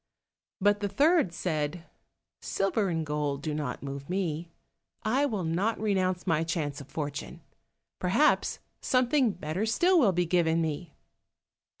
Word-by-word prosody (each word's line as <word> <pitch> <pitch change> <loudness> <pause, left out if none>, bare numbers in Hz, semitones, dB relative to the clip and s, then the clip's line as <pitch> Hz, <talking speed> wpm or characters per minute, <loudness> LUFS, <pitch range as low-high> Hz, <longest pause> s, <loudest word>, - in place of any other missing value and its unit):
But 205 +1 +3
the 205 -1 -1
third 290 - +3
said, 160 -1 -2 0.6
"Silver 195 +1 0
and 165 -2 -1
gold 145 -2 -2
do 155 - -2
not 145 -4 -4
move 140 +1 -6
me, 170 -3 -2 0.5
I 260 +6 +2
will 210 -8 -2
not 180 +8 0
renounce 185 -4 0
my 165 -1 +2
chance 155 -4 -2
of 140 - -12
fortune, 145 -3 -5 0.6
perhaps - - +2 0.2
something 255 0 +3
better 180 +2 -3
still 350 +10 +4
will 225 -10 +5
be 180 0 +1
given 165 -1 +2
me." 160 0 -3
175 Hz, 135 wpm, -29 LUFS, 155-205 Hz, 0.6 s, will